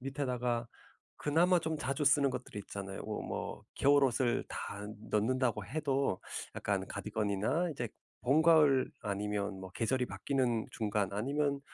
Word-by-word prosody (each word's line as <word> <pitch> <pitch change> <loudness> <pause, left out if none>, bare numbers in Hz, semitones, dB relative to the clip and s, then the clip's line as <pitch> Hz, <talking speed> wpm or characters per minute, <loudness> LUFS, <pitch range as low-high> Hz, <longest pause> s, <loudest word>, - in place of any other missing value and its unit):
밑에다가 125 -3 -1 0.5
그나마 175 +5 +3
좀 160 -1 -2
자주 140 +2 -1
쓰는 140 0 +5
것들이 125 -4 -5
있잖아요. 100 -1 -6
어 - - -4
뭐 - - -5
겨울옷을 135 -4 +3
다 100 0 -5 0.2
넣는다고 115 0 +1
해도 140 -3 0 0.3
약간 - - -1
카디건이나 110 - -1
이제 120 -6 -3 0.3
봄가을 150 -1 +5
아니면 100 -1 -2
뭐 95 0 -8
계절이 120 +6 0
바뀌는 125 -4 0
중간 105 -4 -1
아니면 140 +6 0
125 Hz, 300 characters per minute, -33 LUFS, 105-140 Hz, 0.5 s, 쓰는